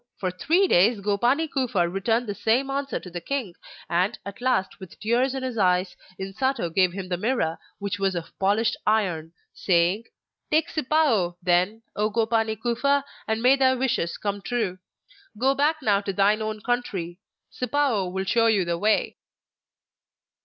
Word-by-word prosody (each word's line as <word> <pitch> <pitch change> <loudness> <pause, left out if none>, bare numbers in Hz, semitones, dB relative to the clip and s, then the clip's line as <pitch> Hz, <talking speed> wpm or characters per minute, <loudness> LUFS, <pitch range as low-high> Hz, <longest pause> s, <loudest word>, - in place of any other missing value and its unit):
For 185 -2 -2
three 335 - +2
days 210 - +4
Gopani 240 +10 +1
Kufa 245 - 0
returned 225 +7 0
the 205 - -3
same 245 +7 +1
answer 275 0 -2
to 180 - -11
the 175 0 -5
king, 260 -8 -3 0.3
and, 185 +6 0
at 200 +3 -8
last, 250 -7 0
with 190 -3 -12
tears 245 +5 +1
in 265 - -4
his 250 -3 -3
eyes, 180 -1 +2 0.2
Insato 195 -1 -2
gave 185 0 +3
him 190 0 -6
the 180 -1 -2
Mirror, 200 -6 -1 0.2
which 200 0 -4
was 195 -1 0
of 170 -1 -6
polished 205 +4 +2
iron, 180 -7 +1 0.2
saying: 180 +4 +1 0.4
'Take 315 0 +2
Sipao, 270 - +1
then, 180 +5 +1
O 210 +1 +1
Gopani 225 -1 0
Kufa, 275 +4 +1 0.2
and 220 +1 -1
may 260 +2 +6
thy 260 -1 +3
wishes 245 -10 -1
come 200 -1 -3
true. 205 -5 -2 0.6
Go 265 +4 +3
back 300 +2 +1
now 205 -3 +3
to 200 -1 -3
thine 205 +3 +3
own 215 -1 -4
country; 195 -8 -2 0.3
Sipao 250 -7 0
will 190 +1 -3
show 230 +3 +3
you 205 -5 +3
the 170 0 -2
way. 215 +2 +1
215 Hz, 165 wpm, -25 LUFS, 190-250 Hz, 0.6 s, may